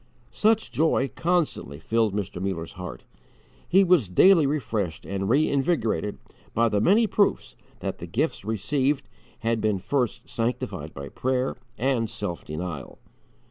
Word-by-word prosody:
Such 220 Hz, +1 st, +2 dB
joy 150 Hz, -5 st, +2 dB
constantly 165 Hz, -, 0 dB
filled 110 Hz, +2 st, +1 dB
Mr. 95 Hz, -3 st, -3 dB
Muller's 95 Hz, -4 st, -3 dB
heart. 90 Hz, -1 st, -8 dB, 0.7 s
He 190 Hz, +2 st, +6 dB
was 170 Hz, -, +4 dB
daily 165 Hz, -, +6 dB
refreshed 110 Hz, -, -2 dB
and 95 Hz, 0 st, -2 dB
reinvigorated 135 Hz, -5 st, +1 dB, 0.4 s
by 115 Hz, +1 st, +3 dB
the 105 Hz, -1 st, +1 dB
many 210 Hz, -, +5 dB
proofs 205 Hz, -1 st, +1 dB, 0.3 s
that -, -, -4 dB
the -, -, -7 dB
gifts -, -, -1 dB
received 130 Hz, +7 st, 0 dB, 0.3 s
had 115 Hz, -1 st, 0 dB
been 105 Hz, -2 st, +1 dB
first 125 Hz, +5 st, -1 dB
sanctified 115 Hz, -, -3 dB
by 70 Hz, +1 st, -7 dB
prayer 130 Hz, 0 st, -1 dB, 0.2 s
and 120 Hz, -3 st, +1 dB
self 90 Hz, -6 st, -5 dB
denial. 75 Hz, -3 st, -6 dB
115 Hz, 135 wpm, -25 LUFS, 95-145 Hz, 0.7 s, He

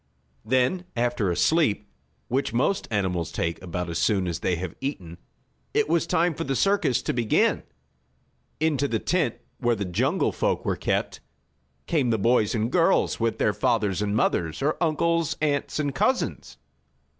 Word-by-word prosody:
Then 130 Hz, +10 st, +1 dB
after 120 Hz, -4 st, 0 dB
a 85 Hz, -, 0 dB
sleep, 105 Hz, -, +2 dB, 0.4 s
which 130 Hz, +1 st, -1 dB
most 190 Hz, +11 st, +1 dB
animals 90 Hz, -6 st, -1 dB
take 85 Hz, 0 st, -2 dB
about 90 Hz, 0 st, -4 dB
as 85 Hz, -1 st, -3 dB
soon 95 Hz, -4 st, +1 dB
as 85 Hz, -, -3 dB
they 90 Hz, -, 0 dB
have 85 Hz, 0 st, -5 dB
eaten, 90 Hz, -, -5 dB, 0.6 s
it -, -, +3 dB
was 165 Hz, +1 st, +1 dB
time 170 Hz, +1 st, +2 dB
for -, -, -4 dB
the 135 Hz, 0 st, -2 dB
circus 165 Hz, -, +2 dB
to -, -, -1 dB
begin. 115 Hz, -3 st, +2 dB, 1.0 s
Into 150 Hz, -3 st, +1 dB
the 115 Hz, -, 0 dB
tent 155 Hz, -1 st, 0 dB, 0.2 s
where 120 Hz, -2 st, +2 dB
the 100 Hz, -2 st, -3 dB
jungle 90 Hz, -1 st, 0 dB
folk -, -, -1 dB
were -, -, 0 dB
kept, -, -, -2 dB, 0.7 s
came 145 Hz, -7 st, +1 dB
the 115 Hz, -, +2 dB
boys 115 Hz, +1 st, +2 dB
and 115 Hz, +2 st, -1 dB
girls, 175 Hz, +3 st, +2 dB
with 115 Hz, -1 st, 0 dB
their 105 Hz, -, +2 dB
fathers 105 Hz, -1 st, 0 dB
and 105 Hz, 0 st, -1 dB
mothers, 80 Hz, -3 st, 0 dB
or 150 Hz, +2 st, +1 dB
uncles, 165 Hz, 0 st, +1 dB
aunts 145 Hz, -2 st, -1 dB
and 145 Hz, -2 st, -1 dB
cousins. 255 Hz, -, -1 dB
120 Hz, 165 wpm, -25 LUFS, 100-150 Hz, 1.0 s, it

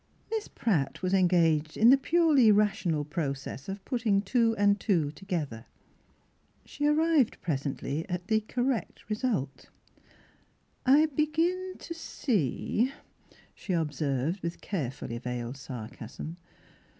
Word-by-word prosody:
Miss 440 Hz, -1 st, -2 dB
Pratt 175 Hz, -, -1 dB
was 185 Hz, +1 st, 0 dB
engaged 165 Hz, -5 st, +3 dB
in 230 Hz, +3 st, +7 dB
the -, -, +9 dB
purely 290 Hz, -5 st, +4 dB
rational 200 Hz, -7 st, +2 dB
process 140 Hz, -2 st, -4 dB
of 195 Hz, 0 st, -6 dB
putting 225 Hz, -6 st, +1 dB
two 230 Hz, +2 st, +2 dB
and 205 Hz, 0 st, +3 dB
two 165 Hz, -10 st, +1 dB
together. 150 Hz, -, -4 dB, 1.0 s
She 290 Hz, -, -2 dB
arrived 305 Hz, -4 st, +3 dB
presently 145 Hz, +1 st, -3 dB
at 180 Hz, 0 st, -3 dB
the 220 Hz, +1 st, +2 dB
correct 245 Hz, -1 st, -2 dB
result. 210 Hz, -, -2 dB, 0.6 s
" -, -, -37 dB
I 310 Hz, -, +6 dB
begin 325 Hz, +5 st, 0 dB
to 335 Hz, -, -7 dB
see," 240 Hz, -, -1 dB, 0.6 s
she 190 Hz, -, -4 dB
observed, 150 Hz, 0 st, -1 dB
with 170 Hz, 0 st, -4 dB
carefully 135 Hz, -, -4 dB
veiled 125 Hz, +1 st, -4 dB
sarcasm. 130 Hz, +6 st, -8 dB
195 Hz, 115 wpm, -29 LUFS, 150-245 Hz, 1.0 s, the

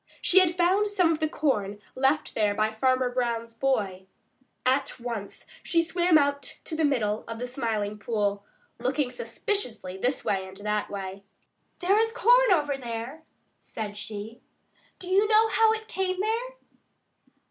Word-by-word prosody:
She 380 Hz, -, +5 dB
had 360 Hz, -1 st, +2 dB
found 375 Hz, +4 st, +3 dB
some 370 Hz, -5 st, +2 dB
of 315 Hz, -, -1 dB
the 310 Hz, -1 st, 0 dB
corn 210 Hz, -11 st, -1 dB
left 270 Hz, +4 st, +1 dB
there 210 Hz, -2 st, +1 dB
by 215 Hz, +1 st, +1 dB
Farmer 255 Hz, +2 st, +1 dB
Brown's 235 Hz, -2 st, -2 dB
boy. 205 Hz, -7 st, -1 dB, 0.6 s
At 260 Hz, +1 st, +1 dB
once 230 Hz, -4 st, -6 dB, 0.2 s
she 335 Hz, -1 st, +2 dB
swam 345 Hz, -1 st, +3 dB
out 285 Hz, -1 st, -1 dB
to 320 Hz, -, -3 dB
the 320 Hz, -, 0 dB
middle 220 Hz, -8 st, +1 dB
of 230 Hz, 0 st, -5 dB
the 245 Hz, -, -4 dB
Smiling 220 Hz, -5 st, -2 dB
Pool, 205 Hz, -2 st, -1 dB, 0.4 s
looking 255 Hz, +2 st, 0 dB
suspiciously 235 Hz, -, -3 dB
this 250 Hz, +7 st, -1 dB
way 190 Hz, -1 st, 0 dB
and 190 Hz, 0 st, -12 dB
that 210 Hz, 0 st, -2 dB
way. 195 Hz, -1 st, -6 dB, 0.6 s
"There 390 Hz, +4 st, +3 dB
is 450 Hz, 0 st, +2 dB
corn -, -, +5 dB
over 290 Hz, -5 st, +2 dB
there," 240 Hz, +4 st, -6 dB, 0.4 s
said 210 Hz, -2 st, -6 dB
she. 210 Hz, +2 st, -7 dB, 0.6 s
"Do 365 Hz, -, -8 dB
you 390 Hz, +3 st, +3 dB
know 440 Hz, +1 st, +5 dB
how 445 Hz, 0 st, +4 dB
it 440 Hz, 0 st, -3 dB
came 370 Hz, -3 st, -2 dB
there?" 460 Hz, +5 st, -1 dB
255 Hz, 160 wpm, -27 LUFS, 215-355 Hz, 0.6 s, She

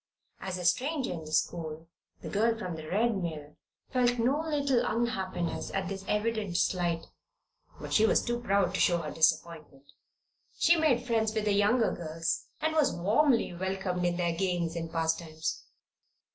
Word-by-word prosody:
As 190 Hz, -1 st, -4 dB
a 180 Hz, -, -5 dB
stranger 265 Hz, -, +1 dB
in 160 Hz, -2 st, -7 dB
the 155 Hz, -, -9 dB
school 160 Hz, 0 st, -1 dB, 0.4 s
the -, -, -5 dB
girl 225 Hz, +2 st, +1 dB
from 185 Hz, -6 st, -4 dB
the 155 Hz, -1 st, -8 dB
Red 225 Hz, +4 st, +2 dB
Mill 150 Hz, -3 st, -5 dB, 0.4 s
felt 245 Hz, -1 st, +2 dB
no 255 Hz, +6 st, +2 dB
little 285 Hz, -6 st, +1 dB
unhappiness 190 Hz, -7 st, -2 dB
at 190 Hz, -2 st, -1 dB
this 195 Hz, -1 st, -5 dB
evident 210 Hz, -4 st, -1 dB
slight; 175 Hz, -3 st, 0 dB, 0.7 s
but -, -, -6 dB
she 220 Hz, 0 st, +5 dB
was -, -, +3 dB
too 240 Hz, 0 st, -1 dB
proud 200 Hz, -5 st, +1 dB
to -, -, -1 dB
show 175 Hz, -, +4 dB
her 150 Hz, -, -5 dB
disappointment. 160 Hz, -3 st, 0 dB, 0.7 s
She 340 Hz, -, +5 dB
made 280 Hz, -7 st, +2 dB
friends 220 Hz, -2 st, 0 dB
with 215 Hz, -1 st, 0 dB
the 205 Hz, -, +2 dB
younger 210 Hz, +4 st, +3 dB
girls 165 Hz, 0 st, -3 dB
and 315 Hz, +1 st, +1 dB
was 310 Hz, -3 st, +3 dB
warmly 225 Hz, -, +2 dB
welcomed 185 Hz, 0 st, -2 dB
in 175 Hz, 0 st, +1 dB
their 170 Hz, -1 st, 0 dB
games 175 Hz, -2 st, -1 dB
and 165 Hz, -1 st, -4 dB
pastimes. 160 Hz, -1 st, -2 dB
190 Hz, 165 wpm, -29 LUFS, 165-235 Hz, 0.7 s, she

